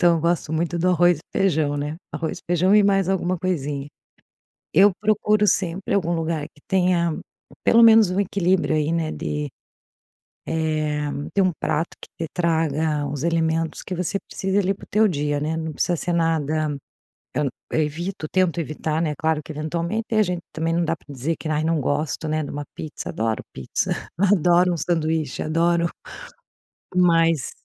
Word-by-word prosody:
então 175 Hz, -2 st, +5 dB
eu -, -, -2 dB
gosto 170 Hz, -1 st, 0 dB
muito 170 Hz, +2 st, -1 dB
do 180 Hz, +2 st, +2 dB
arroz 175 Hz, -2 st, +4 dB
e -, -, -15 dB, 0.2 s
feijão, 155 Hz, -7 st, +2 dB
né. 145 Hz, +2 st, -3 dB, 0.2 s
Arroz 160 Hz, -, -3 dB
e -, -, -20 dB
feijão 180 Hz, +3 st, +4 dB
e 210 Hz, -, +7 dB
mais 195 Hz, -2 st, +2 dB
alguma 185 Hz, -1 st, 0 dB
coisinha. 145 Hz, -6 st, -2 dB, 0.9 s
Eu 195 Hz, +5 st, +7 dB
procuro 210 Hz, 0 st, +2 dB
sempre 190 Hz, 0 st, 0 dB
algum 175 Hz, -4 st, +1 dB
lugar 160 Hz, -2 st, -1 dB
que 145 Hz, -, -25 dB
tenha, 180 Hz, -4 st, +2 dB, 0.5 s
pelo 230 Hz, 0 st, +5 dB
menos, 225 Hz, -3 st, +7 dB
um 185 Hz, -, 0 dB
equilíbrio 185 Hz, -4 st, +1 dB
aí, 155 Hz, 0 st, +1 dB
né, 165 Hz, -1 st, 0 dB
de, 75 Hz, 0 st, -3 dB, 1.0 s
eh, 155 Hz, -2 st, -1 dB, 0.2 s
tem 195 Hz, -, +4 dB
um 185 Hz, -, +2 dB
prato 160 Hz, +2 st, 0 dB
que -, -, -11 dB, 0.2 s
te -, -, -14 dB
traga 160 Hz, -3 st, 0 dB
os 140 Hz, -1 st, -4 dB
elementos 165 Hz, -1 st, 0 dB
que 185 Hz, -, -5 dB
você 180 Hz, +3 st, -1 dB
precise, 190 Hz, +1 st, -1 dB
ali, 195 Hz, 0 st, +1 dB
para -, -, -13 dB
o -, -, -21 dB
teu 215 Hz, +1 st, +4 dB
dia, 145 Hz, -3 st, -1 dB
né, 155 Hz, +2 st, -1 dB
não 160 Hz, -1 st, -3 dB
precisa 175 Hz, +4 st, 0 dB
ser 175 Hz, +2 st, -2 dB
nada 155 Hz, -2 st, 0 dB, 0.6 s
eu, 145 Hz, -2 st, +1 dB, 0.2 s
eu 160 Hz, -, +2 dB
evito, 165 Hz, +3 st, -4 dB
tento 185 Hz, -3 st, +2 dB
evitar, 155 Hz, +1 st, -2 dB
né, 155 Hz, -3 st, 0 dB
claro 160 Hz, -1 st, 0 dB
que -, -, -8 dB
eventualmente 170 Hz, +8 st, -2 dB
a 215 Hz, -, +5 dB
gente 180 Hz, -2 st, -2 dB
também 165 Hz, +1 st, -1 dB
não 170 Hz, 0 st, +1 dB
dá 165 Hz, -, 0 dB
para -, -, -28 dB
dizer 140 Hz, +5 st, -2 dB
que: 155 Hz, -, -5 dB
"Ah, 155 Hz, 0 st, +1 dB
não 160 Hz, -2 st, +1 dB
gosto, 150 Hz, +3 st, -1 dB
né, 155 Hz, 0 st, 0 dB
de 145 Hz, -, -5 dB
uma 145 Hz, 0 st, -4 dB
pizza", 155 Hz, -, -6 dB
adoro 110 Hz, 0 st, -2 dB
pizza, 65 Hz, -, -2 dB, 0.3 s
adoro 180 Hz, -2 st, +4 dB
um -, -, -2 dB
sanduíche, 160 Hz, -4 st, -1 dB
adoro 170 Hz, +2 st, +2 dB, 1.1 s
mas 165 Hz, -5 st, +3 dB
165 Hz, 180 wpm, -23 LUFS, 155-180 Hz, 1.1 s, e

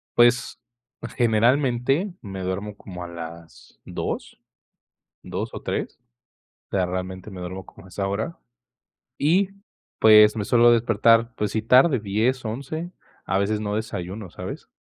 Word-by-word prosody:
Pues, 120 Hz, 0 st, +3 dB, 0.6 s
generalmente, 125 Hz, -, +2 dB
me 95 Hz, -3 st, -7 dB
duermo 100 Hz, +3 st, -4 dB
como 90 Hz, -3 st, -9 dB
a -, -, -6 dB
las 85 Hz, -5 st, -10 dB
2, -, -, -5 dB, 0.8 s
2 -, -, -4 dB
o -, -, -7 dB
3, -, -, -3 dB, 0.7 s
o -, -, -2 dB
sea, 90 Hz, -1 st, +2 dB
realmente 95 Hz, +2 st, -5 dB
me 95 Hz, -1 st, -8 dB
duermo 95 Hz, +1 st, -6 dB
como 95 Hz, -, -15 dB
a -, -, -14 dB
esa 95 Hz, +1 st, -3 dB
hora, 100 Hz, -2 st, -3 dB, 0.8 s
y, 185 Hz, +6 st, +3 dB, 0.5 s
pues, 105 Hz, 0 st, +7 dB
me 105 Hz, -, -2 dB
suelo 120 Hz, 0 st, +5 dB
despertar, 115 Hz, +1 st, +3 dB
pues, 105 Hz, -1 st, -2 dB
sí 110 Hz, -, -1 dB
tarde, 130 Hz, +3 st, +5 dB
10, 110 Hz, +6 st, 0 dB
11, 140 Hz, +10 st, -5 dB, 0.3 s
a 95 Hz, -, 0 dB
veces 105 Hz, +2 st, 0 dB
no 105 Hz, 0 st, -2 dB
desayuno, 100 Hz, -2 st, -5 dB
¿sabes? -, -, -8 dB
110 Hz, 140 wpm, -24 LUFS, 95-120 Hz, 0.8 s, pues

